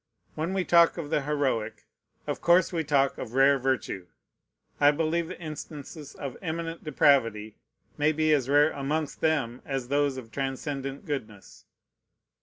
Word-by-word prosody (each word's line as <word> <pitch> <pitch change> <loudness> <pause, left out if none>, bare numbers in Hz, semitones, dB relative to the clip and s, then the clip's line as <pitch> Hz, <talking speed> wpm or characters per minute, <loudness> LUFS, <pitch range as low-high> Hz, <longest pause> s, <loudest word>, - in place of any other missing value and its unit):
When 165 +5 -3
we 185 -2 0
talk 170 0 +5
of 160 -3 -5
the 150 - +2
heroic, 135 -7 -2 0.4
of - - -4
course 175 +1 +4
we 165 -2 0
talk 140 -3 +1
of 115 - -6
rare 135 +1 +5
virtue. 130 -8 -2 0.7
I 145 - +6
believe 160 +2 0
the 185 - -8
instances 150 -2 -8
of 140 -3 -6
eminent 165 -1 -4
depravity 115 -8 +2 0.4
may 150 +1 +4
be 155 0 +2
as 135 -3 +1
rare 145 +2 +5
amongst 145 +2 -3
them 135 -7 0
as 135 -3 -4
those 140 -1 +1
of 115 -3 -9
transcendent 135 +2 -4
goodness. 110 - -7
145 Hz, 150 wpm, -27 LUFS, 135-160 Hz, 0.7 s, I